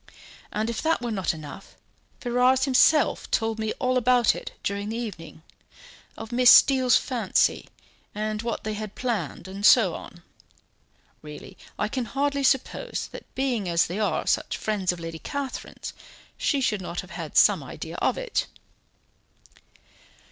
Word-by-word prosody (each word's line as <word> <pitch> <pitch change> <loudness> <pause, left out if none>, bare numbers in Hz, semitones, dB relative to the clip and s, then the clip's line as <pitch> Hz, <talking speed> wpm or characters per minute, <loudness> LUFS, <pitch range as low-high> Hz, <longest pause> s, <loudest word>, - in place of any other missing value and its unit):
And 215 +1 -1
if 235 -1 -3
that 325 +1 +1
were 240 - -2
not 190 -4 0
enough, 155 +4 -10 0.4
Ferrars 250 +2 +2
himself 280 +3 +3
told 225 -1 0
me 220 0 -1
all 255 0 0
about 245 -1 +4
it - - -7
during 200 +1 -2
the 225 - -3
evening, 175 -9 -7 0.7
of 225 +1 -8
Miss 245 0 +5
Steele's 260 -2 +7
fancy, 235 -7 0 0.5
and 215 0 -2
what 230 -1 -4
they 215 - -3
had 210 -1 -6
planned, 235 -7 -3
and 195 +2 -8
so 205 -5 +6
on. 175 +1 -10 1.0
Really, 150 -1 -10 0.2
I 210 - 0
can 250 +2 -3
hardly 280 +3 -1
suppose 270 - 0
that - - -11
being 245 -8 -1
as 170 0 +3
they 180 +5 -4
are, 215 - 0
such - - 0
friends 205 -4 -1
of 180 - -7
Lady 165 -1 -6
Catherine's, 280 - -6 0.4
she 280 -2 0
should 210 -6 0
not 175 -1 -4
have - - -15
had - - -5
some - - +6
idea - - -8
of - - 0
it." - - -2
225 Hz, 155 wpm, -25 LUFS, 200-255 Hz, 1.0 s, Steele's